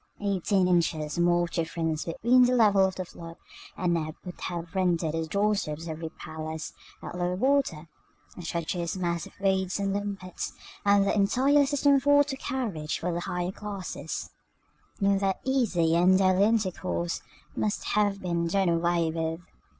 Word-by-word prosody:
Eighteen 195 -2 +1
inches 165 -3 +1
more 175 0 +3
of 170 - -4
difference 165 -1 -2
between 240 +9 +4
the 250 +1 +2
level 205 -5 +5
of 190 -1 -2
the 185 - -4
flood 165 -1 -11 0.4
and 175 -2 +1
ebb 155 -1 -3
would 180 - -8
have 170 -2 -5
rendered 175 -4 +1
the 160 0 -2
doorsteps 195 -5 0
of 170 - -6
every 160 +1 -5
palace, 160 0 -7 0.3
at - - -6
low 180 0 -1
water, 250 - +1 0.5
a - - -8
treacherous 170 +1 -3
mass 170 -3 -2
of - - -19
weeds 190 -1 +1
and 195 -1 0
limpets, 200 -3 -4 0.3
and 200 -1 +4
the - - +1
entire 265 +8 +3
system 285 0 +3
of 275 - -3
water 285 -1 +4
carriage 220 -14 -3
for 180 - -2
the 170 - -1
higher 180 +1 -2
classes, 200 -2 -6 0.7
in 200 -1 +3
their 195 -1 +1
easy 220 -12 +2
and 180 +2 +5
daily 190 +1 +4
intercourse, 185 -5 -1 0.3
must 210 - -1
have 205 -1 +1
been 170 -2 0
done 190 +1 +2
away 170 -1 +1
with. 165 0 -2
180 Hz, 165 wpm, -27 LUFS, 170-205 Hz, 0.7 s, level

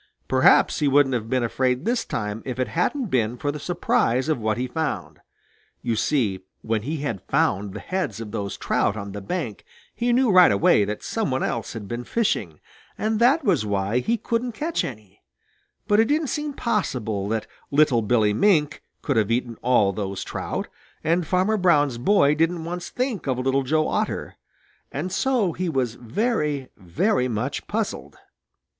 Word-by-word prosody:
Perhaps 130 0 +4
he 150 - +2
wouldn't 140 -1 +4
have 115 -2 -2
been 130 -1 +1
afraid 125 +4 0
this 235 +1 +1
time 105 0 -3
if 130 -2 -5
it 130 - -1
hadn't 225 - -1
been 120 -1 +1
for 145 +3 -1
the 150 - -6
surprise 135 -5 +1
of 155 - +1
what 110 -1 0
he 125 - -1
found. 155 +3 -3 0.6
You 115 - 0
see 110 -6 +1 0.2
when 110 -1 0
he 150 +8 -3
had 115 -10 -3
found 100 0 +1
the - - -4
heads 185 - -3
of 110 -2 -7
those 100 -1 -4
trout 105 - 0
on 100 -1 -6
the 100 +1 -6
bank 120 - -4 0.3
he 240 +1 0
knew 245 -1 +3
right 180 - +7
away 100 +1 +4
that 105 +1 -5
some 225 -7 -1
one 130 0 -1
else 115 - -2
had 110 -4 -7
been 120 +3 -4
fishing, 105 - -1 0.4
and 215 0 0
that 270 +7 +4
was 185 - +2
why 100 +2 0
he 230 - 0
couldn't 235 +2 -2
catch 320 +8 -1
any; 105 -6 -9 0.7
but 205 0 +4
it 225 - +6
didn't 295 +3 0
seem 295 -1 -3
possible 125 - -1
that 110 -1 -1 0.2
little 140 -5 +4
Billy 105 -1 +2
Mink 155 - +2 0.2
could - - 0
have 110 -1 +2
eaten 120 0 -1
all 115 -5 +3
those 100 -1 -4
trout, - - -4 0.4
and 165 +1 +1
Farmer 190 +5 +2
Brown's 145 - +3
boy 145 -1 +4
didn't 165 +2 0
once 175 +1 -5
think 245 - -3
of 130 -2 0
Little 135 +2 +1
Joe 155 +4 +1
Otter, - - -2 0.6
and 165 +7 -3
so 235 -3 +1
he 180 0 -2
was 130 -6 0
very, 150 - -1
very 125 - 0
much 125 +5 -3
puzzled. 215 0 -3
135 Hz, 180 wpm, -24 LUFS, 110-185 Hz, 0.7 s, right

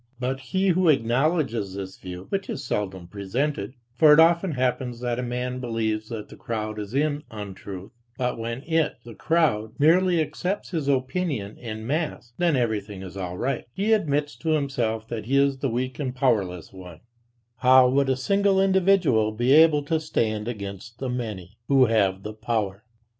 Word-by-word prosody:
But 130 +1 -2
he 190 +8 0
who 180 -1 +3
acknowledges 125 - +1
this 95 -1 -6
view, 90 0 -8
which 195 -1 -2
is - - -4
seldom 95 -7 -3
presented 105 +5 -3 0.2
(for 150 +4 +6
it 150 - +7
often 170 +1 +4
happens, 125 -2 -1
that 120 -1 -1
a - - 0
man 125 +1 -3
believes 110 -3 -2
that 110 -3 -6
the - - -11
crowd 110 -2 -4
is 105 +4 -6
in 145 0 +1
untruth, 100 -2 -8 0.3
but 125 -1 -1
when 115 +3 -5
it, 160 -2 +1
the 120 - -9
crowd, 110 -9 +1
merely 175 +4 +4
accepts 160 +6 -2
his 160 -6 -2
opinion 130 - -1
en 110 -2 -6
masse, 145 -3 -3
then 170 -4 +3
everything 105 -5 -2
is 95 0 -9
all 90 -2 -5
right), 135 +3 -2
he 210 +3 +1
admits 150 -8 0
to 160 - -4
himself 120 -7 -1
that 110 -2 -5
he 135 +2 +2
is 140 -1 +2
the 135 - -1
weak 130 +3 -3
and 130 -3 -3
powerless 100 - 0
one; 90 -3 -11 0.6
how 130 0 +6
would 135 +1 +2
a 130 - +3
single 200 +5 +2
individual 185 - +3
be 120 +4 0
able 155 0 +6
to 160 +3 0
stand 110 -8 -1
against 100 0 -6
the 130 - -4
many, 110 -5 -5
who 135 -2 +5
have 100 -4 +1
the 105 - -5
power! 110 -2 -2
125 Hz, 175 wpm, -25 LUFS, 110-150 Hz, 0.6 s, it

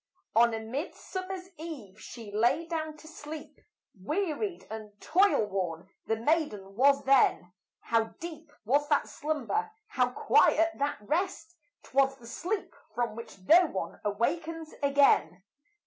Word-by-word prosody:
On 235 +1 +6
a - - -3
midsummer's 365 - -5
eve 260 - -8
she 225 -4 -9
lay 240 +10 +2
down 315 -2 -4
to 315 - -14
sleep, 310 -1 -9 0.4
Wearied 355 - -2
and 210 -2 -8
toil 380 - +3
worn 185 -3 -3 0.2
the 225 - +2
maiden 225 -7 -1
was 275 +4 +4
then; 255 -9 +3 0.3
How 230 -1 +2
deep 320 -2 -8
was 285 +6 +2
that 290 - +2
slumber, 310 - -2 0.2
how 250 - +2
quiet 330 +6 +4
that 285 +1 0
rest, 330 - -2 0.3
'Twas 270 +2 +2
the 240 -3 -16
sleep 365 - -3 0.2
from 240 -2 -1
which 230 -2 -9
no 335 - +6
one 190 - -5
awakens 315 +10 -2
again. 275 - +3
280 Hz, 130 wpm, -29 LUFS, 225-325 Hz, 0.4 s, On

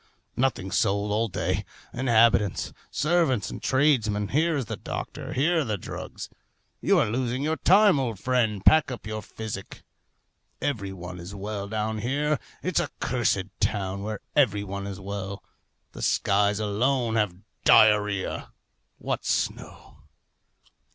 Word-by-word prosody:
Nothing 120 -7 0
sold 100 +1 +1
all 110 +2 +1
day. 95 - -1 0.3
Inhabitants, 115 -5 +3 0.2
servants, 150 - +1
and - - -7
tradesmen, 115 -8 +2
here 160 +3 +2
is 135 - -2
the - - -4
doctor, - - -6
here 165 +6 +2
are - - +2
the 110 -5 -2
drugs. - - -7 0.5
You - - +3
are - - +4
losing 125 +3 -1
your 160 +1 0
time, 195 -3 +5
old 120 -5 -2
friend. 110 -3 0
Pack 155 -3 +6
up 125 -5 -7
your 110 0 -4
physic. 105 -2 -7 0.8
Every 115 -9 -2
one 90 -1 -8
is 90 +4 -8
well 100 0 -4
down 110 +1 -2
here. 145 +6 0 0.2
It's 185 -2 +1
a 165 -5 -1
cursed 120 -6 +1 0.2
town, 100 -1 -1
where 105 0 -4
every 105 -8 +3
one 100 0 -5
is 100 -1 -6
well! 100 0 -5 0.5
The - - -9
skies 100 +1 +2
alone 115 +3 +1
have 105 -5 +1 0.3
diarrhoea 105 -2 +4 0.4
what - - -3
snow! - - -3
110 Hz, 140 wpm, -26 LUFS, 100-130 Hz, 0.8 s, Pack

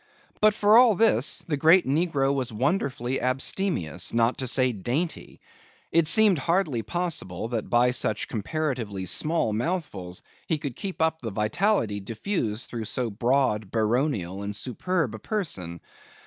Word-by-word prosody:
But 215 -1 +4
for 215 +2 +6
all 240 -4 +6
this, 225 +3 +1
the 150 -3 -1
great 165 +5 +5
negro 140 -1 +1
was 130 -3 -2
wonderfully 130 - -1
abstemious, 130 - -2
not 115 +1 +2
to 130 - -2
say 130 +1 +3
dainty. 125 - -4 0.5
It 165 -2 +3
seemed 205 -1 +6
hardly 165 -5 0
possible 155 - -3
that 115 -3 -3
by 120 +1 +3
such 110 -4 -1
comparatively 115 - -3
small 150 - +1
mouthfuls 110 - -4 0.2
he 160 - 0
could 140 -4 -6
keep 190 -4 -3
up 160 0 0
the 115 - -4
vitality 110 - 0
diffused 110 - -3
through 115 -2 -5
so 115 +2 -2
broad, 115 -2 0
baronial, 110 - -1
and 100 0 -4
superb 135 - -1
a 110 - -7
person. 95 - -4
130 Hz, 145 wpm, -25 LUFS, 110-165 Hz, 0.5 s, for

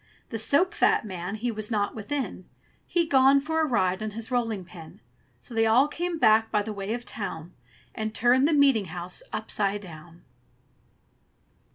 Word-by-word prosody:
The 225 - -4
soap 285 - +2
fat - - +2
man 185 0 -5
he 235 +3 -2
was 215 -1 -3
not 205 -3 0
within: 220 -4 -4 0.4
He'd 340 -2 0
gone 270 +1 +6
for 320 +3 -2
a - - +3
ride 190 -8 0
on 215 - -2
his 225 +3 -6
rolling 225 -6 -1
pin. 170 -2 -13 0.4
So 240 - -11
they 225 0 +2
all 245 +6 +5
came 345 +3 -3
back 220 -5 +4
by 210 -2 +1
the 215 0 -5
way 200 +2 -3
of 240 - -6
the - - -20
town, 175 -5 -6 0.4
And 220 0 -3
turned 245 +5 +3
the 325 - +1
meeting 275 -8 +4
house 175 +1 -6
upside 205 -1 -2
down. 170 -2 -13
220 Hz, 180 wpm, -26 LUFS, 195-260 Hz, 0.4 s, gone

